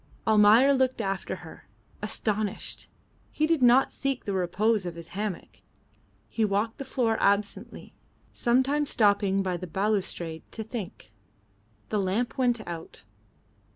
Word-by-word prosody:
Almayer 220 +5 +6
looked 260 -2 +1
after 195 -3 -2
her, - - -13 0.3
astonished. 210 -2 -3 0.4
He 310 - 0
did 325 -3 +1
not 250 +2 +5
seek 275 -2 -2
the 200 - -2
repose 195 +4 +1
of 170 - -5
his 170 -1 -9
hammock. 200 -1 -5 0.7
He 225 - -1
walked 210 +2 0
the 275 - -5
floor 235 -4 0
absently, 200 0 -1 0.4
sometimes 270 +4 +1
stopping 200 -2 +2
by 185 -2 -1
the 180 - -7
balustrade 180 -3 -2
to 220 - -4
think. 215 - -8 0.8
The 210 - 0
lamp 200 +6 -1
went 245 -4 0
out. 165 -8 -8
215 Hz, 130 wpm, -27 LUFS, 195-245 Hz, 0.8 s, Almayer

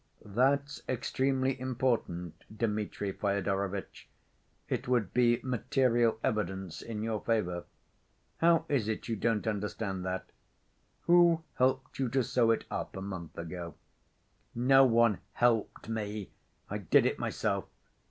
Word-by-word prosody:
"That's 140 +7 +1
extremely 130 +1 0
important, 120 -10 -2
Dmitri 105 -2 -2
Fyodorovitch. 100 -1 -2 0.6
It 130 - -2
would 120 -6 +1
be 120 -1 +4
material 125 -2 +2
evidence 95 -4 -2
in 110 -2 -5
your 110 -2 -2
favor. 90 -7 -1 0.7
How 165 -1 +4
is 130 -7 +1
it 110 - -3
you 115 - -1
don't 110 0 0
understand 105 -2 -2
that? 95 0 -4 0.7
Who 170 -1 +5
helped 130 +1 0
you 130 -3 +1
to 130 +2 +2
sew 120 0 +2
it 115 - +2
up - - -4
a - - -5
month 90 -4 -7
ago?" 85 -1 -6 0.8
"No 135 +3 +6
one 115 -4 +4
helped 115 -4 +1
me. 105 -2 -4 0.4
I - - -3
did - - +4
it - - 0
myself." - - -1
115 Hz, 125 wpm, -31 LUFS, 100-130 Hz, 0.8 s, No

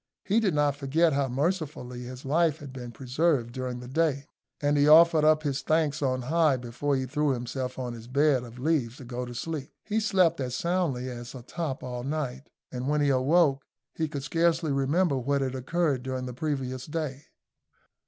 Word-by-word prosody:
He 210 +3 +3
did 195 -8 +1
not 145 -1 +2
forget 150 +3 +2
how 140 -1 +1
mercifully 140 -3 -2
his 125 +2 -9
life 160 +2 +2
had 140 -4 -10
been 125 -2 -7
preserved 130 +1 0
during 125 -1 -4
the 125 - -9
day, 145 0 0 0.3
and 145 -1 +1
he 145 0 +4
offered 160 0 +7
up 155 0 +4
his 140 -2 -1
thanks 155 -1 +1
on 130 -2 0
high 155 0 +3
before 125 +4 -2
he 130 -1 -1
threw 145 +2 +1
himself 125 +1 -4
on 125 -2 -4
his 115 0 -10
bed 140 0 +3
of 120 0 -11
leaves 130 -4 0
to 130 - -10
go 125 +1 -4
to 120 0 -8
sleep. 150 +1 -4
He 215 +1 0
slept 185 -7 +2
as 125 -1 -2
soundly 170 -8 0
as 120 0 -7
a 125 - -9
top 145 0 -4
all 125 -1 -4
night, 140 -2 -4 0.2
and 125 +2 -3
when 150 0 +2
he 145 - +3
awoke 140 +2 +3 0.3
he 160 - -1
could 145 -2 -5
scarcely 165 +1 +1
remember 140 +2 +1
what 140 +3 0
had 130 -1 -1
occurred 140 +1 0
during 130 0 -4
the 125 - -5
previous 130 -2 -3
day. 150 -3 -4
140 Hz, 195 wpm, -27 LUFS, 125-155 Hz, 0.3 s, offered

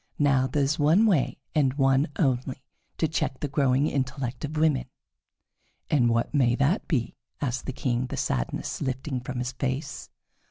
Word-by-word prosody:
Now 135 -3 +3
there 140 +2 0
is 140 +3 0
one 160 +9 +5
way, 180 -11 +2 0.2
and 140 -4 +2
one 135 +1 +3
only, 130 -3 0 0.3
to 160 - +2
check 145 -4 -2
the 145 - -2
growing 135 0 +2
intellect 130 -3 -2
of 150 +1 -4
women." 155 -3 +2 1.1
"And 125 -6 +4
what 115 0 0
may 125 -5 +3
that 140 - +1
be?" 125 -8 -1 0.2
asked 130 -2 -2
the - - -1
King, 125 -1 -1
the - - -5
sadness - - -2
lifting 130 0 -2
from 130 +1 -5
his 125 0 -2
face. 135 +2 -4
135 Hz, 165 wpm, -26 LUFS, 130-145 Hz, 1.1 s, one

